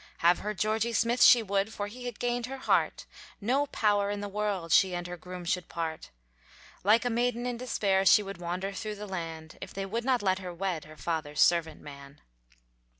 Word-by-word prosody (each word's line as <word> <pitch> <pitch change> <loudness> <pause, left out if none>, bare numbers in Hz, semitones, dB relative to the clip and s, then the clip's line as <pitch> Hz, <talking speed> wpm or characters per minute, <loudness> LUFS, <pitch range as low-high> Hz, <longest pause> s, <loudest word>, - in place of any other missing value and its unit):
Have 175 +1 +5
her 210 +1 -4
Georgy 220 +4 0
Smith 235 +2 +1
she 240 -2 +8
would 200 +1 0
For 205 - -4
he 245 +4 -9
had 240 - -6
gained 245 0 -1
her 270 +1 -6
heart; - - +1 0.3
No 260 +7 +1
power 205 -5 +1
in 205 0 -2
the 205 - -4
world, 200 -4 -2
She 185 +1 +5
and 175 0 -4
her 180 0 -5
groom 180 0 -9
should 180 +1 -1
part. 160 -1 -4 0.7
Like 220 +5 +4
a - - +2
maiden 240 +1 0
in 245 -1 -2
despair, 205 -6 +1
She 205 +2 +6
would 195 -2 -8
wander 180 +3 -3
through 215 +2 -5
the 210 +1 -7
land, 165 -4 -6
If - - -8
they 195 0 -3
would 230 +5 -3
not 255 -3 +1
let 190 -1 +2
her 180 -2 -7
wed, 180 -3 -2
Her 155 0 -13
father's 155 -3 -3
servant 165 -2 +3
man. 140 0 -12
195 Hz, 210 wpm, -29 LUFS, 175-225 Hz, 0.7 s, she